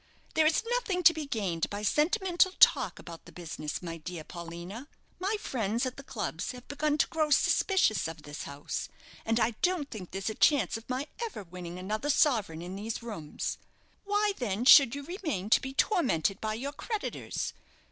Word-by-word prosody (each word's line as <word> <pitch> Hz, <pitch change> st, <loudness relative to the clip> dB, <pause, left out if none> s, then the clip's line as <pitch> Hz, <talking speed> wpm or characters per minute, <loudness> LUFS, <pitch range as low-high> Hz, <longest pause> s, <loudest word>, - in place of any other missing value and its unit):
There's 315 Hz, +3 st, +3 dB
nothing 455 Hz, -7 st, 0 dB
to 335 Hz, -, +8 dB
be 310 Hz, -2 st, -5 dB
gained 195 Hz, -, -1 dB
by 205 Hz, +1 st, -5 dB
sentimental 360 Hz, -, +2 dB
talk -, -, +5 dB
about 170 Hz, -1 st, -10 dB
the 170 Hz, -, -13 dB
business, 155 Hz, -2 st, -5 dB
my 165 Hz, -1 st, -5 dB
dear 165 Hz, 0 st, -7 dB
Paulina. 170 Hz, -, -8 dB, 0.3 s
My 390 Hz, +4 st, 0 dB
friends 230 Hz, -, -1 dB
at 255 Hz, -, -3 dB
the -, -, -9 dB
clubs 275 Hz, -, -4 dB
have 250 Hz, 0 st, -12 dB
begun 300 Hz, +1 st, 0 dB
to -, -, +4 dB
grow 310 Hz, -2 st, 0 dB
suspicious 295 Hz, -, +3 dB
of 160 Hz, -1 st, -8 dB
this 145 Hz, 0 st, -7 dB
house, 140 Hz, +1 st, -5 dB, 0.4 s
and 225 Hz, +1 st, +2 dB
I 235 Hz, -, +3 dB
don't 355 Hz, -6 st, +1 dB
think 195 Hz, -6 st, -7 dB
there's 195 Hz, +3 st, -3 dB
a -, -, -5 dB
chance 285 Hz, +6 st, +3 dB
of 225 Hz, +2 st, -8 dB
my 255 Hz, +3 st, -1 dB, 0.2 s
ever 435 Hz, -, -5 dB
winning 175 Hz, -1 st, -8 dB
another 215 Hz, +9 st, -3 dB
sovereign 220 Hz, -, +2 dB
in 180 Hz, +2 st, -6 dB
these 220 Hz, +3 st, -4 dB
rooms. 185 Hz, -11 st, -4 dB, 0.4 s
Why, 410 Hz, 0 st, +1 dB
then, 230 Hz, -1 st, -1 dB
should 275 Hz, -3 st, +9 dB
you 285 Hz, -, -5 dB
remain 305 Hz, -, -4 dB
to -, -, +6 dB
be 265 Hz, -, -5 dB
tormented 260 Hz, -, +1 dB
by 215 Hz, 0 st, -1 dB
your 275 Hz, +5 st, -4 dB
creditors? 435 Hz, +4 st, -4 dB
235 Hz, 180 wpm, -30 LUFS, -, 0.4 s, should